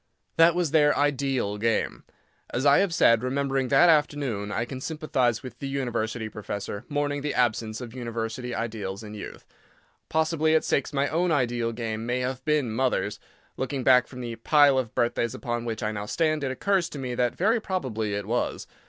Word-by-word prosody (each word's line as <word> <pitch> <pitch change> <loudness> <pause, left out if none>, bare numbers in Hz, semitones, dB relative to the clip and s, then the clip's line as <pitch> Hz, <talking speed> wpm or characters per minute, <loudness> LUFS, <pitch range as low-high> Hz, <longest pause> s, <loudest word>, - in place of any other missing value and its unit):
That 165 +1 +6
was 175 -5 0
their 150 -2 +4
"ideal" 135 -7 0
game. 115 +1 -1 0.4
As 130 +3 -2
I 140 0 +6
have 195 -2 +2
said, 115 -8 +4
remembering 135 +1 0
that 140 +7 +5
afternoon, 145 -10 +1
I 115 +3 -1
can 130 +1 -7
sympathise 130 -7 0
with 130 - -9
the 140 - -4
University 120 -4 -2
professor 105 0 -6
mourning 145 0 -1
the 145 0 -2
absence 115 -2 0
of 120 -2 -8
University 120 0 -4
ideals 105 -3 -4
in 105 0 -8
youth. 105 - -9 0.6
Possibly 160 0 +2
at 160 - +3
six 140 - 0
my 140 -1 +1
own 170 +3 +1
ideal 120 -5 +1
game 115 -1 -4
may 125 +1 0
have 130 0 -3
been 150 -6 +1
"Mothers." 115 -3 0 0.4
Looking 130 0 -2
back 125 -1 +5
from 125 -1 -9
the 120 -1 -5
pile 140 +2 +5
of 120 -4 -4
birthdays 120 -1 0
upon 120 -1 -3
which 115 0 -4
I 110 - 0
now 105 -1 -5
stand, 155 +2 0
it 135 - 0
occurs 185 +6 0
to - - -8
me 130 -2 -4
that 120 0 0
very 220 +5 +2
probably 115 - -2
it 100 -1 -3
was. 120 +4 -2
125 Hz, 190 wpm, -26 LUFS, 115-145 Hz, 0.6 s, That